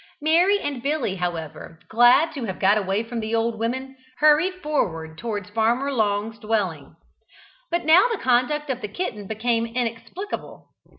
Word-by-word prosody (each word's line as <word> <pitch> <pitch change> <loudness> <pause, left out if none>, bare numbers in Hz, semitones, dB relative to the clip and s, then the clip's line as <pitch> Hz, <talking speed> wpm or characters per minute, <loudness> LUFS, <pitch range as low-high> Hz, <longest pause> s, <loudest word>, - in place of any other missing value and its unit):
Mary 345 +7 +3
and 280 -9 -4
Billy, 275 -8 -1
however, 165 -2 -5
glad 240 +8 +5
to 270 -5 -4
have 190 -3 -5
got 200 +2 +4
away 200 +1 0
from 230 +1 -5
the 220 +1 -2
old 225 -1 0
women, 260 +4 -3 0.2
hurried 305 +5 +4
forward 165 - -2
towards 205 0 -5
Farmer 235 +6 +1
Long's 215 -1 -1
dwelling. 190 -11 -2 0.7
But 345 -1 -1
now 340 +8 +6
the 455 - -1
conduct 270 +2 +1
of 255 -1 -4
the 210 - -3
kitten 210 - -5
became 230 +2 0
inexplicable. 240 - -5
230 Hz, 155 wpm, -23 LUFS, 205-290 Hz, 0.7 s, now